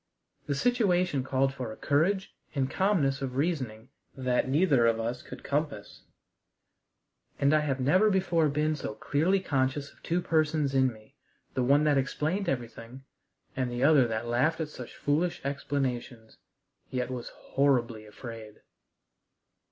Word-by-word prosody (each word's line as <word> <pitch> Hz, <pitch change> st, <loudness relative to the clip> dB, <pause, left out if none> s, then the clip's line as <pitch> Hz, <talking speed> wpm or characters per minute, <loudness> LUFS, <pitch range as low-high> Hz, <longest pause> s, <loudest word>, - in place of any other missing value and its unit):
The 140 Hz, -, 0 dB
situation 180 Hz, -, +2 dB
called 135 Hz, +1 st, +1 dB
for 125 Hz, -5 st, -5 dB
a 110 Hz, -, -9 dB
courage 185 Hz, +7 st, +1 dB, 0.2 s
and 135 Hz, -1 st, 0 dB
calmness 155 Hz, -9 st, +1 dB
of 130 Hz, -2 st, -4 dB
reasoning 130 Hz, -7 st, -2 dB, 0.3 s
that 130 Hz, -1 st, 0 dB
neither 140 Hz, -5 st, +4 dB
of 115 Hz, -1 st, +2 dB
us 120 Hz, +2 st, -3 dB
could -, -, -11 dB
compass, 140 Hz, -8 st, -3 dB, 1.4 s
and 140 Hz, +2 st, +3 dB
I 155 Hz, -, +5 dB
have 140 Hz, -3 st, -1 dB
never 185 Hz, +11 st, +4 dB
before 175 Hz, -5 st, +2 dB
been 150 Hz, +2 st, 0 dB
so 110 Hz, -7 st, -5 dB
clearly 170 Hz, -, +1 dB
conscious 140 Hz, -3 st, -1 dB
of -, -, -27 dB
two 170 Hz, +2 st, 0 dB
persons 155 Hz, -4 st, +1 dB
in 130 Hz, -1 st, +3 dB
me 110 Hz, -1 st, -17 dB, 0.4 s
the 130 Hz, -, 0 dB
one 140 Hz, +4 st, +4 dB
that 145 Hz, -2 st, +3 dB
explained 160 Hz, +8 st, -1 dB
everything, 120 Hz, 0 st, -5 dB, 0.5 s
and 130 Hz, -1 st, -1 dB
the 120 Hz, +1 st, -2 dB
other 140 Hz, -4 st, +6 dB
that 110 Hz, 0 st, -3 dB
laughed 125 Hz, +8 st, +1 dB
at 160 Hz, -2 st, -2 dB
such 125 Hz, -5 st, -9 dB
foolish 160 Hz, +5 st, 0 dB
explanations, 130 Hz, -5 st, -3 dB, 0.5 s
yet 125 Hz, -1 st, -2 dB
was 125 Hz, -2 st, -5 dB
horribly 120 Hz, -6 st, 0 dB
afraid. 110 Hz, -1 st, -10 dB
140 Hz, 145 wpm, -29 LUFS, 125-155 Hz, 1.4 s, other